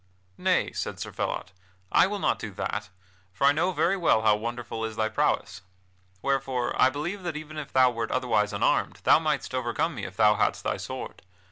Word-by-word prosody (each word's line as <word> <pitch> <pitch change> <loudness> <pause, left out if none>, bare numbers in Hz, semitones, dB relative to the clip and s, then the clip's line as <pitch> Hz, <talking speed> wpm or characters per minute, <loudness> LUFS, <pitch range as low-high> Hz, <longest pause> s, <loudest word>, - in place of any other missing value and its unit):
"Nay," - - +2
said - - -4
Sir - - -5
Phelot, 90 - -3 0.4
"I - - +5
will 205 +1 -3
not - - 0
do 110 - -5
that, 105 +1 -3 0.4
for 95 +8 0
I 140 - +7
know 160 +5 +1
very 185 +1 +2
well 165 - +2
how 110 -1 +5
wonderful 115 +1 -4
is 110 -1 -3
thy 110 -1 0
prowess. 100 -2 0 0.6
Wherefore 135 -2 0
I 130 - +7
believe 165 +9 -4
that 175 -4 -4
even 155 0 -8
if 145 - -7
thou 130 -1 +5
wert 115 -2 -3
otherwise 115 -5 +1
unarmed 100 - 0
thou - - +6
mightst 155 -4 -2
overcome 130 +6 -1
me 110 -8 -5
if 95 - -9
thou 105 -1 +5
hadst - - +1
thy - - -1
sword. - - -7
125 Hz, 200 wpm, -27 LUFS, 110-150 Hz, 0.6 s, I